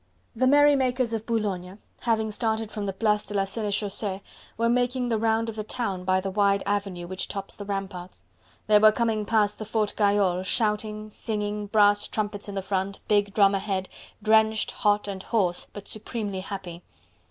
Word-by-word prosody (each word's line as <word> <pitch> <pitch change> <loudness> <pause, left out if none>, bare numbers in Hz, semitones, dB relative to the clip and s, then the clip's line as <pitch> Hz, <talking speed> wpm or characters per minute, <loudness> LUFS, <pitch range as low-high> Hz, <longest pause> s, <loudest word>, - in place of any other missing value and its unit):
The 255 +3 +2
merrymakers 265 -4 +4
of 220 -1 -3
Boulogne, 200 -5 -2 0.2
having 220 -2 0
started 220 0 -1
from 205 -1 -4
the - - 0
Place 210 +1 +1
de 205 - -5
la 195 - +3
Senechaussee, 200 -1 -2 0.4
were 230 +1 +2
making 245 +1 +1
the 225 -2 +1
round 225 +1 +1
of 225 - -5
the 215 - -3
town 200 -6 -3
by 185 0 +3
the 195 +1 -3
wide 200 0 +2
avenue 195 -3 -2
which 185 +1 -2
tops 195 -1 -5
the 205 - -7
ramparts. 195 -2 -5 0.4
They 210 -1 +6
were 215 0 +7
coming 220 -1 0
past 210 -2 +2
the 215 - -5
Fort 215 -1 0
Gayole, 200 -3 +2
shouting, 215 +1 -1
singing, 210 -1 -3
brass 205 -1 +4
trumpets 205 -1 -3
in 200 -1 -3
front, 190 +1 -2
big 205 -1 +2
drum 200 -2 +5
ahead, 195 -1 -2 0.3
drenched, 220 0 +3
hot, 210 -2 +1
and 195 -2 -5
hoarse, 190 -5 0
but 205 - -10
supremely 215 -3 -3
happy. 185 -3 -7
210 Hz, 175 wpm, -26 LUFS, 195-220 Hz, 0.4 s, were